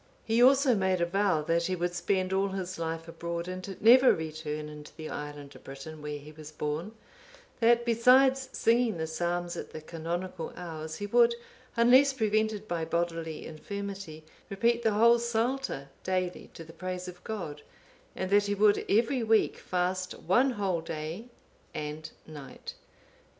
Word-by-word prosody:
He 225 +1 +2
also 270 +1 +6
made 190 -3 +1
a 170 - +2
vow 185 -3 +1
that 170 +2 +1
he 185 - -1
would 175 0 -2
spend 185 +1 0
all 195 +1 +2
his 190 -2 -5
life 165 0 -3
abroad 170 +1 -5
and 185 +1 -6
never 250 +4 +7
return 155 -1 -5
into 150 0 -10
the 155 -1 -6
island 145 -1 -7
of - - -14
Britain, 145 +3 -9
where 150 0 -4
he 145 +1 -12
was 155 0 -11
born; 155 +7 -4 0.7
that 235 0 +4
besides 260 +3 +4
singing 230 -3 +2
the 160 - -2
psalms 175 +2 -2
at - - -7
the 155 - -5
canonical 170 +2 -5
hours, 160 -3 -6
he 205 - -5
would, 235 +2 +4 0.4
unless 255 +4 +6
prevented 215 -2 0
by 170 -2 -2
bodily 165 -1 -2
infirmity, 195 -1 -7 0.3
repeat 235 +4 +1
the 220 -2 +2
whole 235 +3 +5
Psalter 235 - -1
daily 185 -1 -2
to 165 - -8
the 165 0 -13
praise 185 0 -5
of 180 0 -10
God; 170 -9 -5 0.5
and 185 0 -3
that 205 0 +4
he 205 - 0
would 205 0 +4
every 235 +5 +2
week 220 -1 +2
fast 185 0 -2
one 245 +10 +3
whole 195 -6 -1
day 160 +6 -5 0.5
and 150 +1 -5 0.2
night. 145 -4 -9
185 Hz, 160 wpm, -29 LUFS, 160-220 Hz, 0.7 s, never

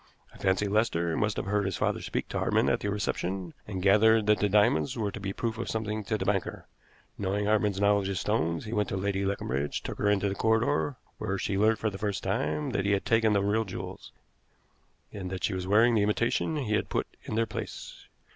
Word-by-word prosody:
I - - -15
fancy 95 +2 +1
Lester 100 -6 +1
must 105 -1 0
have - - -2
heard 100 0 0
his 95 - -2
father - - 0
speak - - -3
to - - -2
Hartmann - - +2
at - - +1
the 105 - -2
reception, 95 -3 -2
and 95 -3 -4
gathered 110 +2 +5
that 105 0 +3
the 105 - +2
diamonds 100 -6 +3
were 105 -3 -1
to 100 - -7
be 100 -1 -4
a - - -3
proof 115 -1 -3
of 120 - -3
something 110 -1 -2
to 110 - 0
the 95 - -3
banker. 95 -2 -1 0.5
Knowing 100 +1 -1
Hartmann's 105 -2 +2
knowledge 100 -1 +3
of 95 - -2
stones, 85 -6 0
he 110 - -5
went 105 -3 0
to 95 - -2
Lady 100 0 -1
Leconbridge, 75 -8 -2
took - - -6
her 105 - +2
into 100 -1 +2
the 95 - -1
corridor, 115 +7 +1 0.2
where 95 - -2
she 95 +1 -2
learnt 110 +2 +3
for 110 - -1
the 95 - -8
first 100 -2 -2
time 75 0 -1
that 95 - 0
he 100 - +3
had 100 - 0
taken 115 -1 +3
the 100 -1 +2
real 105 +2 +2
jewels, 95 - -8 1.0
and 95 -3 -5
that 95 0 -5
she 105 - +1
was 95 0 -3
wearing 115 +4 +5
the 110 - +3
imitation 115 +9 +1
he 125 -8 -1
had 105 - 0
put - - 0 0.2
in - - -4
their 115 +1 +2
place. 105 - -7
100 Hz, 230 wpm, -28 LUFS, 95-110 Hz, 1.0 s, gathered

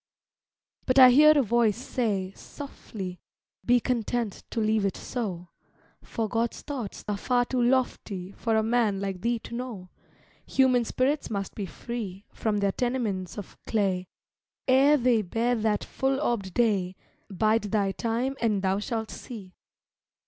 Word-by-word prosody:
But 255 0 +2
I 255 -1 +10
hear 305 +4 +7
a 280 - +4
voice 225 -2 +2
say, 210 -7 -2
softly, 200 -10 -8 0.4
"Be 245 0 +4
content 235 -3 -2
to 235 - -3
leave 215 -1 +2
it 195 - -1
so, 185 -8 -4 0.5
For 225 -1 -3
God's 230 +2 -2
thoughts 255 -9 -6
are 205 -1 -1
far 245 +3 +1
too 250 0 -1
lofty 240 -7 0
For 225 +2 -1
a 220 - +3
man 220 -3 +1
like 195 -2 -4
thee 235 +1 +1
to 230 - -10
know; 235 -7 -6 0.6
Human 255 -3 +3
spirits 275 +6 0
must 200 -3 -3
be 200 -3 -4
free 205 -1 -6
From 215 -2 -1
their 200 -1 +2
tenements 220 -7 -2
of 205 - -9
clay, 190 -4 0 0.6
Ere 275 +3 +6
they 245 -4 +3
bear 230 +5 0
that 215 -3 0
full 270 0 -1
orbed 230 -9 -1
day, 200 -6 +1 0.3
Bide 215 +3 +1
thy 205 -2 +1
time 235 +6 -1
and 210 -4 +1
thou 190 +1 +1
shalt 220 +1 -3
see." 200 -7 -9
225 Hz, 150 wpm, -27 LUFS, 200-245 Hz, 0.6 s, I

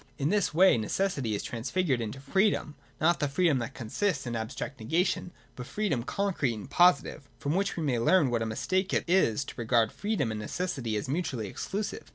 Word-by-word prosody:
In 140 +1 0
this 205 -1 +2
way 180 -5 +5
necessity 130 - -1
is - - -4
transfigured 130 +3 -1
into 115 +4 -5
freedom, 190 +2 +1
— - - -32
not 170 +2 +3
the 145 - +1
freedom 145 -1 +2
that 125 +3 -5
consists 140 - -1
in 120 -1 -3
abstract 115 +5 -5
negation, 170 - 0 0.3
but 125 -1 -7
free 215 -1 -2
dom 130 -7 0
concrete 155 - -1
and 105 - -8
positive. 175 -2 +3
From 145 - -2
which 195 +1 0
we 165 - -1
may 130 -5 +1
learn 140 +2 +4
what 120 -1 0
a 115 - -1
mistake 185 - -1
it - - +1
is 145 - +2
to - - -8
regard 115 -2 +2
freedom 205 - -1
and 110 - -4
necessity 125 -2 -3
as 105 - -2
mutually 140 - -2
exclusive. 205 - -4
140 Hz, 205 wpm, -29 LUFS, 115-185 Hz, 0.3 s, way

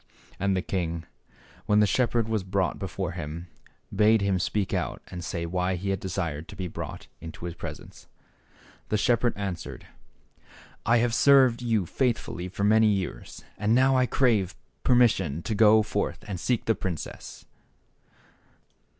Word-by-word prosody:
And 100 -1 +1
the 90 - -1
king, 85 -3 -3 0.6
when 105 0 +4
the 105 - +5
shepherd 120 0 +1
was 110 -3 -1
brought 95 0 -1
before 95 -2 -3
him, 85 0 -6 0.5
bade 110 +1 +5
him 100 -2 +1
speak 100 +2 -1
out - - -2
and 90 -1 -7
say 85 +1 -3
why 90 +2 -1
he 95 +2 -2
had 95 - -1
desired 85 -5 -3
to - - -10
be 95 -2 -4
brought - - -7
into 80 +1 -8
his 85 - -4
presence. 85 - -9 0.8
The 105 - +2
shepherd 120 +1 +2
answered, 95 -4 -5 0.5
" - - -24
I 115 +2 +5
have 120 0 +1
served 130 -3 +5
you 115 -6 +1
faithfully 105 -5 -1
for 100 +2 -4
many 110 +2 +5
years, 95 - -3 0.2
and 105 +2 +2
now 130 +1 +4
I 130 -1 +3
crave 105 -9 +2 0.3
permission 95 - +3
to 110 - -2
go 110 +1 +6
forth 105 -1 -3
and 95 -4 -4
seek 120 +3 0
the 115 - +3
princess." 90 -6 -6
100 Hz, 160 wpm, -27 LUFS, 90-115 Hz, 0.8 s, go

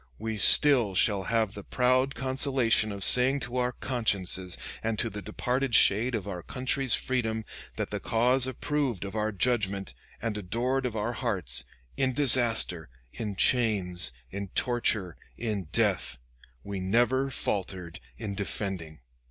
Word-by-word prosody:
We 110 +3 -4
still 120 -3 +6
shall 100 0 +2
have 110 -3 0
the 100 - -9
proud 130 +2 +1
consolation 130 -5 +2
of 100 -1 -5
saying 130 +5 +4
to 120 +2 -4
our 125 0 0
consciences, 95 -7 -1 0.2
and 115 -1 -2
to 115 +1 -1
the 105 - -7
departed 125 +5 -1
shade 115 +5 +5
of 100 -3 -4
our 90 -3 -5
country's 130 +4 0
freedom, 110 -4 -2 0.3
that - - -4
the - - -3
cause 125 +3 +2
approved 130 -5 -2
of 95 - -7
our 110 0 -1
judgment, 100 - -1 0.3
and 115 -2 -3
adored 125 +7 -1
of 115 - -7
our 110 +3 -2
hearts, 95 - -1 0.3
in 130 -1 0
disaster, 115 - +3 0.2
in 105 -3 -5
chains, 95 - +1 0.2
in 100 +1 -5
torture, 110 -8 0 0.2
in 105 -5 -3
death, 75 - -1 0.5
we 100 -1 -5
never 120 +8 +1
faltered 95 -7 -4 0.2
in 100 -2 -5
defending." 95 - -4
110 Hz, 145 wpm, -28 LUFS, 100-125 Hz, 0.5 s, still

